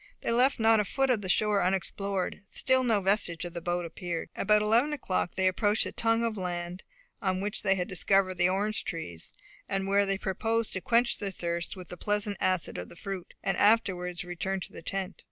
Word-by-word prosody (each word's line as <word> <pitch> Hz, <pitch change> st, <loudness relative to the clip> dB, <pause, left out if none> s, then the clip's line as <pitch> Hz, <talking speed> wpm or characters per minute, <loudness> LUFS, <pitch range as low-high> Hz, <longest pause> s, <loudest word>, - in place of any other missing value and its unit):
They -, -, -1 dB
left 250 Hz, +3 st, +3 dB
not 225 Hz, 0 st, +5 dB
a -, -, +3 dB
foot 270 Hz, +5 st, +1 dB
of 225 Hz, -4 st, +1 dB
the 190 Hz, -, -5 dB
shore 210 Hz, +1 st, +3 dB
unexplored; 195 Hz, +1 st, -1 dB
still 260 Hz, -1 st, +2 dB
no 225 Hz, -5 st, +2 dB
vestige 185 Hz, -4 st, +1 dB
of 175 Hz, -, -7 dB
the 170 Hz, -, -5 dB
boat 175 Hz, +1 st, -1 dB
appeared. 170 Hz, 0 st, -5 dB
About 210 Hz, +1 st, +3 dB
eleven 235 Hz, +8 st, +3 dB
o'clock 190 Hz, -10 st, -2 dB
they 190 Hz, -, +1 dB
approached 205 Hz, +3 st, +3 dB
the -, -, -2 dB
tongue 230 Hz, 0 st, +1 dB
of 230 Hz, -2 st, -1 dB
land 175 Hz, -1 st, -4 dB, 0.4 s
on 185 Hz, -1 st, 0 dB
which 200 Hz, +1 st, -2 dB
they 195 Hz, -, +3 dB
had 180 Hz, -2 st, -2 dB
discovered 185 Hz, -1 st, +2 dB
the 175 Hz, +1 st, +4 dB
orange 205 Hz, +3 st, 0 dB
trees, 85 Hz, -, -5 dB, 0.4 s
and 195 Hz, 0 st, 0 dB
where 200 Hz, +1 st, +3 dB
they 195 Hz, 0 st, 0 dB
proposed 225 Hz, +4 st, -1 dB
to 185 Hz, -, -2 dB
quench 235 Hz, +4 st, +2 dB
their 200 Hz, -, -2 dB
thirst 170 Hz, -1 st, -3 dB
with 180 Hz, -2 st, -10 dB
the 180 Hz, -, -7 dB
pleasant 205 Hz, +1 st, -1 dB
acid 185 Hz, -, 0 dB
of 90 Hz, -, -7 dB
the -, -, -13 dB
fruit, 190 Hz, 0 st, -7 dB
and 195 Hz, -, 0 dB
afterwards 180 Hz, -5 st, +2 dB
to 180 Hz, -, -8 dB
return 190 Hz, +2 st, -2 dB
to -, -, -6 dB
the -, -, -9 dB
tent. 195 Hz, +2 st, -4 dB
195 Hz, 215 wpm, -29 LUFS, 180-210 Hz, 0.4 s, not